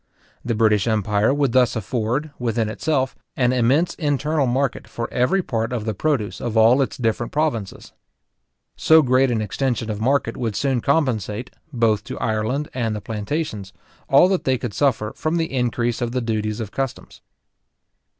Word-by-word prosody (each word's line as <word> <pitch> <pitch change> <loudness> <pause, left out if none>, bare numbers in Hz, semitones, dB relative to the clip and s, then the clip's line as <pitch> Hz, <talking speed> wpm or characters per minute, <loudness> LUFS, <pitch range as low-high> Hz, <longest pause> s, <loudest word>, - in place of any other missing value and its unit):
The 120 -2 -1
British 105 -1 +3
empire 105 0 +2
would 140 -2 +1
thus 125 0 +3
afford, 120 +7 -2
within 115 -2 -1
itself, 135 +2 -1 0.2
an 125 -1 +2
immense 130 +8 +2
internal 150 -1 0
market 130 +1 -1
for 115 - -4
every 180 +10 +2
part 115 -4 -2
of 115 -4 -3
the 110 - -1
produce 115 -2 -1
of 120 -2 -2
all 115 +5 +6
its 135 - -2
different 115 -1 -1
provinces. 145 -10 -2 0.8
So 160 0 +5
great 130 +1 +3
an 115 -3 0
extension 115 -1 -2
of 105 0 -5
market 130 -1 +1
would 115 -4 -3
soon 135 -4 0
compensate, 125 - 0 0.2
both 115 -5 +1
to - - -6
Ireland 110 +7 -1
and 115 -4 -1
the - - -3
plantations, 105 -2 -4 0.4
all 140 +6 +6
that 190 -2 0
they 130 -1 +1
could 120 -4 -5
suffer 115 -6 0
from 160 +2 -1
the 160 -4 -2
increase 120 -1 -1
of 120 0 -2
the 130 - 0
duties 110 -2 -2
of 110 -3 -5
customs. 135 0 -5
120 Hz, 170 wpm, -22 LUFS, 110-135 Hz, 0.8 s, all